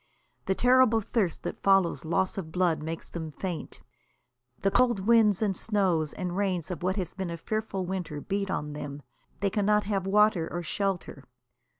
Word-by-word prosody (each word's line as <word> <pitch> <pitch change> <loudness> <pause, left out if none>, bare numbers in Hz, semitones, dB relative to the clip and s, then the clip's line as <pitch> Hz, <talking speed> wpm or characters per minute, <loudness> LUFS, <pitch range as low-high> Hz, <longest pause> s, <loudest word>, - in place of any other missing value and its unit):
The 190 - +2
terrible 250 -1 +5
thirst 205 -5 -1
that - - -5
follows 195 -4 +3
loss 175 +3 0
of 160 -4 -7
blood 175 -3 +1
makes 160 +1 -5
them 160 -2 -6
faint; 175 +1 -6 0.8
the 195 - +3
cold 240 -4 +3
winds 220 -1 +4
and 200 -3 +1
snows 180 -8 +1
and 180 -1 -4
rains 185 -3 -1
of 180 - -5
what 185 +1 0
has 185 -5 -3
been 190 -2 -4
a 170 - -4
fearful 210 0 -3
winter 180 -5 -4
beat 195 +4 -2
on 150 -4 -3
them; 145 -1 -7 0.4
they 200 -1 +1
cannot 210 +1 +2
have 195 -2 -1
water 205 -4 +3
or 175 0 -3
shelter. 185 -5 -3
190 Hz, 175 wpm, -28 LUFS, 170-205 Hz, 0.8 s, terrible